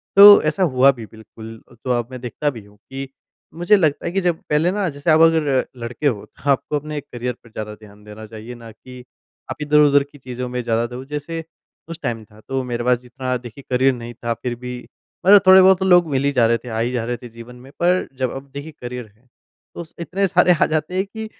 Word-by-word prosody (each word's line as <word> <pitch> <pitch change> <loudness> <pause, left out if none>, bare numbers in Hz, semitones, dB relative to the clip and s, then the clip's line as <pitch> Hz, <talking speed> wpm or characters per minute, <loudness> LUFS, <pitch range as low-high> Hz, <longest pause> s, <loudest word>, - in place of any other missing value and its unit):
तो 205 +1 +10
ऐसा 160 +5 +1
हुआ 130 +2 +5
भी 120 -4 -9
बिल्कुल 110 0 -12 0.2
तो 130 - -2
अब 120 -1 -3
मैं 130 - -7
देखता 125 +5 -2
भी 115 -7 -9
हूँ 105 0 -21
कि 135 0 -6 0.5
मुझे 175 +5 +3
लगता 155 -6 0
है - - -2
कि 195 +2 0
जब 175 -3 0
पहले 155 +4 +2
ना 200 -1 -1
जैसे 145 +2 -1
आप 155 - +5
अगर 165 -1 +5 0.4
लड़के 120 +5 -2
हो 110 -7 -2
तो 140 - -8
आपको 140 +2 -1
अपने 150 +1 -6
करियर 125 -2 -5
पर 115 - -17
ज़्यादा 105 -1 -6
ध्यान 105 -1 -17
देना 105 +1 -11
चाहिए 110 +2 -9
ना 115 -1 -12
कि 125 +2 -13 0.5
आप 130 - -5
इधर-उधर 145 -1 +4
की - - -15
चीज़ों 125 -1 -6
में 125 0 -3
ज़्यादा 115 0 0
दो। 125 +2 -8
जैसे 150 +3 -5 0.5
उस 165 0 -7
टाइम 115 -4 -3
था 105 0 -20
तो 135 0 -1
मेरे 120 -1 -4
पास 125 0 +2
जितना 125 +1 -4
देखिए 120 +2 -12
करियर 130 +2 +3
नहीं 120 -1 -8
था 120 - +1
फिर 125 -1 -2
भी 125 +1 -7 0.5
मतलब 200 +1 +8
थोड़े-बहुत 190 0 +7
तो 190 - -1
लोग 175 -2 +5
मिली 140 +1 +1
जा 125 -4 +3
रहे 115 +1 +2
थे, 120 +2 -11
आ 110 -1 -3
ही 120 +2 0
जा 125 -2 -2
रहे 120 +1 -3
थे 120 - -11
जीवन 115 +2 -12
में 125 +2 -15
पर 180 +1 +2
जब 130 -2 0
अब 135 +1 -9
देखिए 145 +3 -7
करियर 125 0 -6
है 120 +4 -32 0.5
तो 170 - -5
स 160 - -20
इतने 180 +4 -1
सारे 180 0 +4
आ - - +5
जाते 155 +3 -2
हैं 190 +1 0
कि 220 +2 -8
130 Hz, 240 wpm, -20 LUFS, 120-160 Hz, 0.5 s, तो